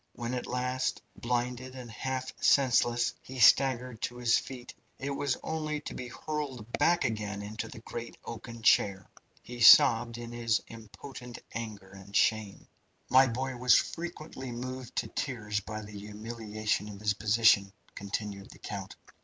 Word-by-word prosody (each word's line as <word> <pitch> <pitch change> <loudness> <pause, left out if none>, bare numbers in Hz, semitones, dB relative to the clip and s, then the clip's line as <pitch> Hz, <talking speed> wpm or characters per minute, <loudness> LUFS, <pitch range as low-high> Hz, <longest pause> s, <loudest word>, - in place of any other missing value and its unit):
When 120 +1 -4
at 125 - -3
last, 125 +1 -1 0.2
blinded 125 +1 -2
and 125 -3 -8
half 130 +3 -3
senseless, 120 -3 +4
he 130 - -9
staggered 125 -1 +4
to 120 - -3
his 120 -1 +3
feet, 125 -2 -9 0.2
it 140 +1 -4
was 140 -1 -1
only 155 -1 -2
to - - -7
be 125 - -6
hurled 140 -4 -4
back 175 0 +3
again 105 -2 -3
into 105 +2 -5
the 110 - -10
great 115 0 -7
oaken 115 0 -8
chair. 100 -5 +3 0.4
He 120 +2 -8
sobbed 115 -2 +8
in 120 0 -7
his 115 -2 +1
impotent 120 +3 -10 0.2
anger 105 -4 -6
and 95 +1 -12
shame. 105 -1 +1 0.4
"My 130 +1 +7
boy 130 +2 -3
was 125 -1 +5
frequently 155 -6 -4
moved 125 +1 -6
to - - -1
tears 105 -7 -2
by 110 0 -6
the 105 - -10
humiliation 105 0 -3
of 100 -1 -9
his 105 0 +1
position," 105 -1 +4 0.2
continued 100 0 -5
the - - -13
count. 100 -2 -7
120 Hz, 155 wpm, -30 LUFS, 105-130 Hz, 0.4 s, sobbed